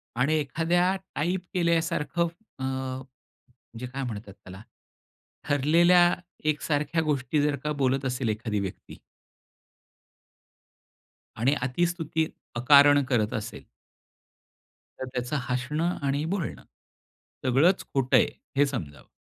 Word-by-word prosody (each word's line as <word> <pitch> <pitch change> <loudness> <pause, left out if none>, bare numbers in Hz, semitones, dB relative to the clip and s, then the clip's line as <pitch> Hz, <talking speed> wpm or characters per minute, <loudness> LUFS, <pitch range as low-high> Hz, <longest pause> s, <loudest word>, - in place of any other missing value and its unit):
आणि 130 +6 +2
एखाद्या 170 +6 +1 0.2
टाइप 175 +5 0
केल्यासारखं 170 -1 +1 0.3
अ, - - -4
म्हणजे 130 0 -5 0.6
काय 135 +2 -5
म्हणतात 105 -5 -6
त्याला, 95 0 -12 0.9
ठरलेल्या 170 +5 +5 0.3
एकसारख्या 150 +1 0
गोष्टी 150 0 0
जर 145 0 +1
का 150 - -1
बोलत 135 0 +1
असेल 125 -2 -1
एखादी 110 -1 -2
व्यक्ती 95 -2 -7 2.4
आणि 125 +5 +2
अतिस्तुती 160 +4 0 0.3
अकारण 145 +3 +6
करत 110 -4 +1
असेल 110 +1 -5 1.4
तर - - -3
त्याचं 125 +4 -2
हसणं 150 +8 -1
आणि 140 +2 0
बोलणं, 185 -7 -4 0.8
सगळंच 140 +9 +3
खोट 135 -2 0
आहे, - - +6 0.3
हे 145 - +6
समजावं. 85 - -6
140 Hz, 105 wpm, -27 LUFS, 125-160 Hz, 2.4 s, अकारण